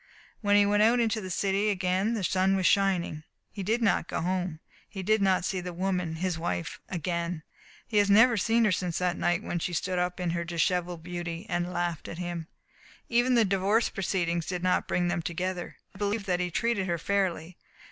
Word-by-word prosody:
When 205 -2 +3
he 205 0 +6
went 205 +1 +3
out 230 +3 +5
into 225 -2 +1
the 185 - -6
city 195 +3 +1
again 190 +3 0
the 210 - -3
sun 190 +2 +2
was 190 -1 0
shining. 185 -6 +2 0.3
He 200 - -6
did 225 +5 0
not 200 -5 +2
go - - -3
home. 180 -2 -2 0.3
He 190 -2 -6
did 215 +2 +2
not 190 -2 +2
see 185 0 -1
the 180 0 -6
woman 180 -3 -1
his 175 0 -2
wife 170 0 -3
again. 170 -1 -3 0.4
He 220 - -2
has 205 -1 +4
never 225 +4 +6
seen 225 +3 +2
her 210 - +3
since 180 -2 -1
that 180 -1 0
night 175 0 0
when 175 - -2
she 175 - -3
stood 180 +2 -1
up 180 +1 -1
in 175 -2 -1
her 170 0 -1
dishevelled 175 0 -1
beauty 175 +1 -5
and 175 -1 -1
laughed 175 -3 -2
at 165 - -7
him. 175 -2 -4 0.6
Even 245 +1 +3
the 230 -2 +5
divorce 200 +4 +2
proceedings 170 -3 -1
did 180 -2 -3
not 185 0 +1
bring 175 0 +1
them 175 0 0
together. 175 +2 -4 0.2
I - - -14
believe 205 0 -1
that 180 -2 0
he 180 0 -1
treated 205 +1 0
her 170 -1 0
fairly. 180 -2 -1
185 Hz, 210 wpm, -28 LUFS, 175-200 Hz, 0.6 s, he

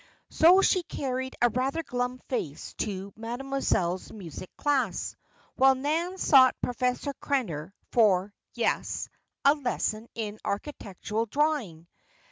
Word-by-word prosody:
So 360 +4 +6
she 370 - +4
carried 260 -5 -4
a 240 - +6
rather 270 +7 -1
glum 245 -2 -2
face 155 - -4
to 195 -1 -3
Mademoiselle's 230 -6 -1
music 185 -3 -8
class, 265 -9 0 0.4
while 265 0 +6
Nan 320 +7 -1
sought 265 -7 +6
Professor 250 +3 -1
Krenner 190 - -1 0.2
for 200 -4 +3 0.2
yes! - - -1 0.4
a 280 - +8
lesson 245 -5 -2
in 215 -2 -4
architectural 210 -1 -3
drawing. 260 - 0
250 Hz, 110 wpm, -28 LUFS, 205-280 Hz, 0.4 s, a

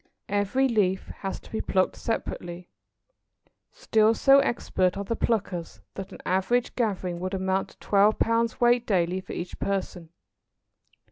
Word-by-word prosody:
Every 205 +7 +1
leaf 195 -6 0
has 195 -1 -4
to - - -16
be 220 - -2
plucked 185 -1 +1
separately. 175 -5 -4 1.0
Still 225 - +2
so 275 +4 +6
expert 190 -9 0
are 200 - -2
the 230 +3 -2
pluckers 190 -8 -2
that 195 -1 -7
an - - -9
average 190 +7 +1
gathering 190 -7 -1
would 185 +2 -3
amount 190 0 -1
to - - -20
twelve 205 +1 +3
pounds 230 0 +1
weight 240 0 +3
daily 185 -2 +1
for - - -9
each 175 +1 -6
person. 185 -4 -3
200 Hz, 145 wpm, -26 LUFS, 185-230 Hz, 1.0 s, so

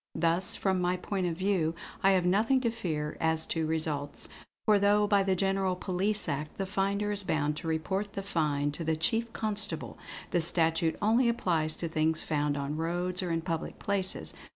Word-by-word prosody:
Thus, 170 +3 +1
from 190 -2 0
my 180 +1 +1
point 185 0 -2
of 165 -2 -3
view, 185 -4 +1 0.3
I 195 0 +5
have 185 -2 +2
nothing 220 +8 +3
to 235 -3 +1
fear 155 -10 -3
as 160 0 +2
to 160 -1 -1
results; 155 -3 -2 0.4
for 210 -2 +5
though 205 +1 +4
by 205 -1 +3
the 190 -1 +1
General 195 0 +1
Police 195 +3 0
Act 150 +2 -3
the 195 - -1
finder 200 +2 0
is 205 -1 0
bound 150 -4 0
to 165 - -5
report 190 +6 -1
the 195 - -4
find 150 -6 0
to 165 - -4
the 160 0 +1
Chief 225 +8 0
Constable, 205 -7 -3 0.3
the 175 - +3
statute 165 0 +3
only 235 +3 +4
applies 165 -9 0
to 170 - -3
things 160 0 +1
found 145 -2 0
on 140 +2 -3
roads 175 +3 -1
or 180 - -3
in 165 0 0
public 165 -1 -4
places. 195 -2 -2
180 Hz, 190 wpm, -30 LUFS, 160-200 Hz, 0.4 s, I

